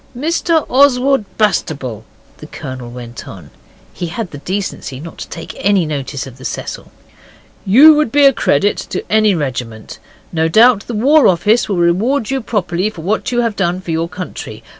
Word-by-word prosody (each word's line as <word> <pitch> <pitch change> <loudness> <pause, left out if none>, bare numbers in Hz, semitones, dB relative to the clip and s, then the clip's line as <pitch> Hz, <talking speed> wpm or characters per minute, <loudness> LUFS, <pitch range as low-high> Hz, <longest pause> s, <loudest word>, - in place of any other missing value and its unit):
'Mr 325 +3 0
Oswald 270 -2 +3
Bastable,' 140 - -1 0.3
the 150 - -11
Colonel 130 -6 -8
went 120 0 -9
on 85 -7 -11 0.4
he 175 - -5
had 180 +3 -5
the 145 - -8
decency 185 -7 -4
not 165 +3 -10
to - - -7
take 165 - -8
any 195 -3 +2
notice 140 -2 -4
of 130 -1 -12
the - - -12
'Cecil' - - -6 0.8
'you 280 +11 +8
would 300 -6 +1
be 290 0 +4
a 275 - +6
credit 200 - +1
to - - -5
any 215 -2 +3
regiment. 125 -7 -5 0.3
No 160 -1 +1
doubt 220 +4 +4
the 235 - -4
War 285 +7 +4
Office 210 +7 +2
will 195 - -1
reward 210 +10 +1
you 270 -1 -1
properly 205 -4 -1
for 185 -6 -10
what 210 +7 -1
you 240 0 +1
have 230 -3 -1
done 180 -2 -1
for 180 -2 -6
your 165 +1 -1
country. 150 - -8
185 Hz, 180 wpm, -16 LUFS, 150-235 Hz, 0.8 s, you